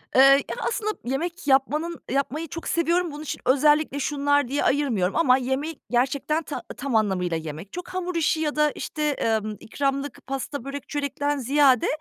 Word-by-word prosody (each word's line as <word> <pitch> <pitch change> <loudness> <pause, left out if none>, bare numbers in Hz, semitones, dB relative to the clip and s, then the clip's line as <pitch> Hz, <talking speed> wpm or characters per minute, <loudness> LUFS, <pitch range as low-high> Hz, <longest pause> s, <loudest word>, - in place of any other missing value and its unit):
Eee, 260 - +8 0.3
ya, - - -3
aslında 430 -2 -1
yemek 325 +7 -3
yapmanın 300 +5 +1
yapmayı 280 +4 -1
çok 330 +3 -7
seviyorum 340 +1 +1
bunun 295 +1 -7
için 310 - -5
özellikle 295 +2 +3
şunlar 285 -1 +1
diye 280 +4 -1
ayırmıyorum 235 -10 +1
ama 260 -6 +5
yemeği 265 +4 -3
gerçekten 275 +6 +1
ta 295 - -5 0.2
tam 275 -4 -2
anlamıyla 185 -6 +1
yemek. 160 +4 -8
Çok 360 0 -6
hamur 365 -1 -3
işi 320 -1 +2
ya 300 -2 -1
da, 300 0 +3
işte, 300 -1 -2 0.3
ımm, 210 0 -5
ikramlık, 275 +3 -3
pasta, 270 0 -4
börek, 275 0 -6
çörekten 285 0 -1
ziyade 270 -1 +4
285 Hz, 165 wpm, -25 LUFS, 260-305 Hz, 0.3 s, Eee